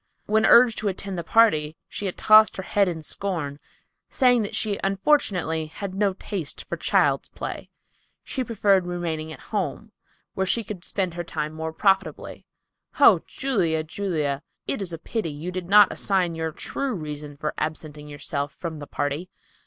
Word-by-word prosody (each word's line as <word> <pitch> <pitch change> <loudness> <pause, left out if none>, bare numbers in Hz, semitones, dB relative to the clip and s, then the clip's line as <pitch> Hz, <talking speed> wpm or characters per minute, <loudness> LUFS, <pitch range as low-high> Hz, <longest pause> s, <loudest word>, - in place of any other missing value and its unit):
When 220 +1 +3
urged 235 -1 +6
to 215 - -2
attend 195 0 -3
the - - -4
party, 160 -7 +3
she 205 - -4
had 185 - -5
tossed 215 0 +6
her 190 - -4
head 200 +1 +2
in 165 -3 -4
scorn 155 -6 -3 0.5
saying 250 -3 +4
that 205 - -4
she 205 -2 0
unfortunately 195 - +1
had 185 +4 -6
no 200 0 +1
taste 185 -4 -5
for - - -3
child's - - +1
play. - - -6 0.5
She 260 - -3
preferred 200 -5 +2
remaining 165 -3 -3
at - - -9
home, 205 +2 -2 0.4
where 190 0 -1
she 230 +4 +1
could 195 -4 -7
spend 185 -3 -2
her 175 0 -4
time 155 -2 -4
more 160 0 -4
profitably. 195 +3 0 0.5
Oh, - - +7
Julia, 180 - 0
Julia! 155 -5 -2 0.2
It - - -2
is 185 -3 -3
a 165 - -4
pity 190 +2 -3
you 155 +5 -5
did 180 -1 -5
not 205 0 +7
assign 185 -4 +1
your 160 0 -3
true 265 - -3
reason 150 -3 -7
for 150 +1 -3
absenting 155 -1 -5
yourself 145 0 -3
from 165 -3 -6
the 145 - -8
party. 145 +5 -3
180 Hz, 170 wpm, -24 LUFS, 155-205 Hz, 0.5 s, Oh